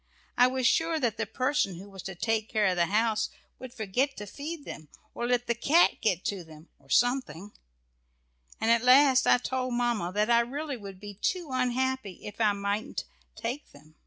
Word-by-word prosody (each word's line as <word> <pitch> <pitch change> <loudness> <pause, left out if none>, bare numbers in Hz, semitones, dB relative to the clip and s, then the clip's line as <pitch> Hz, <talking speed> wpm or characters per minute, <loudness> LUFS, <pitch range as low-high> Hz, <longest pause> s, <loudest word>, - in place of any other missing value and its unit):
I 245 - +6
was 260 0 -1
sure 325 +4 +2
that 240 -6 0
the 225 -1 -2
person 255 -4 0
who 190 +4 -10
was 195 -2 -10
to 190 - -7
take 220 +3 -1
care 215 -1 +1
of 185 -2 +2
the 170 -1 +2
house 220 +2 +1 0.3
would 255 -1 -8
forget 245 +5 -1
to 210 - -6
feed 290 - -7
them, 155 -2 -9 0.2
or 240 - -3
let 245 0 +1
the 235 - +1
cat 295 +8 +3
get 185 -5 +1
to 195 -3 -2
them 160 0 -15
or 135 -1 -25
something, 230 - +1 1.1
and 225 - +2
at 235 -1 +4
last 260 +1 +6
I - - +6
told 255 0 -2
Mamma 235 -7 0
that 210 +3 +1
I 235 - +6
really 280 +5 -3
would 200 -5 -10
be 205 0 -8
too 355 -5 -1
unhappy 255 -5 -1
if 210 +2 -7
I 210 -2 +4
mightn't 200 +5 -3 0.3
take 235 +6 -5
them. 150 +2 -18
235 Hz, 195 wpm, -28 LUFS, 200-255 Hz, 1.1 s, I